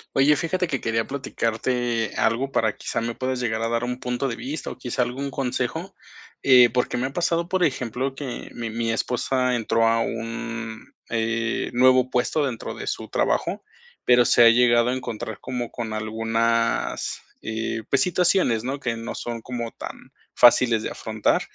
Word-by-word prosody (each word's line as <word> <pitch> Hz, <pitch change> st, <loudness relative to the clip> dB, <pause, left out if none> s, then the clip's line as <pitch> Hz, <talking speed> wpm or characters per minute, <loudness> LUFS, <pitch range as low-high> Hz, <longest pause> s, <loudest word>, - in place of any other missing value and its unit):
Oye, 140 Hz, +2 st, +5 dB
fíjate 180 Hz, +4 st, 0 dB
que 135 Hz, -6 st, -2 dB
quería 115 Hz, 0 st, 0 dB
platicarte 120 Hz, -3 st, -1 dB
algo 125 Hz, +5 st, +1 dB
para 110 Hz, -5 st, +1 dB
quizá -, -, -3 dB
me 115 Hz, 0 st, -2 dB
puedas 130 Hz, +1 st, -2 dB
llegar 110 Hz, -3 st, -1 dB
a 115 Hz, -, 0 dB
dar 115 Hz, +1 st, 0 dB
un 125 Hz, +1 st, -3 dB
punto 125 Hz, +2 st, -2 dB
de 120 Hz, -, -3 dB
vista 135 Hz, +4 st, -5 dB
o -, -, -9 dB
quizá 125 Hz, 0 st, -1 dB
algún 130 Hz, +3 st, -4 dB
consejo. 135 Hz, +7 st, -3 dB, 0.5 s
Eh, 125 Hz, -2 st, +7 dB
porque 125 Hz, -1 st, 0 dB
me 125 Hz, -, 0 dB
ha 135 Hz, -, -9 dB
pasado, 170 Hz, 0 st, 0 dB
por 185 Hz, 0 st, +1 dB
ejemplo, 130 Hz, -1 st, -1 dB
que 135 Hz, -3 st, -6 dB
mi 115 Hz, -2 st, -4 dB
mi 115 Hz, 0 st, -1 dB
esposa 125 Hz, +2 st, 0 dB
entró 115 Hz, 0 st, +2 dB
a 115 Hz, 0 st, +3 dB
un 115 Hz, 0 st, -5 dB, 0.2 s
eh, 115 Hz, 0 st, -1 dB
nuevo, 130 Hz, +1 st, +6 dB
eh, 130 Hz, -, -7 dB
puesto 125 Hz, +5 st, +1 dB
dentro 130 Hz, -5 st, -3 dB
de -, -, -7 dB
su -, -, -3 dB
trabajo, -, -, 0 dB, 0.4 s
pero 120 Hz, 0 st, +5 dB
se 120 Hz, -, +6 dB
ha 115 Hz, -, +9 dB
llegado 120 Hz, 0 st, +4 dB
a 125 Hz, -, 0 dB
encontrar 110 Hz, -4 st, -5 dB
como 125 Hz, -2 st, -4 dB
con 115 Hz, -3 st, -5 dB
algunas, 115 Hz, +1 st, 0 dB, 0.2 s
eh, 110 Hz, 0 st, -3 dB
pues 140 Hz, -, +3 dB
situaciones, 180 Hz, -, +2 dB
¿no?, 135 Hz, +3 st, -3 dB
que 120 Hz, -4 st, -2 dB
no 115 Hz, 0 st, -5 dB
son 120 Hz, -1 st, -5 dB
como 120 Hz, -1 st, -4 dB
tan -, -, -9 dB, 0.2 s
fáciles 120 Hz, -2 st, +5 dB
de -, -, -2 dB
afrontar, 110 Hz, -1 st, 0 dB
120 Hz, 180 wpm, -24 LUFS, 115-130 Hz, 0.5 s, ha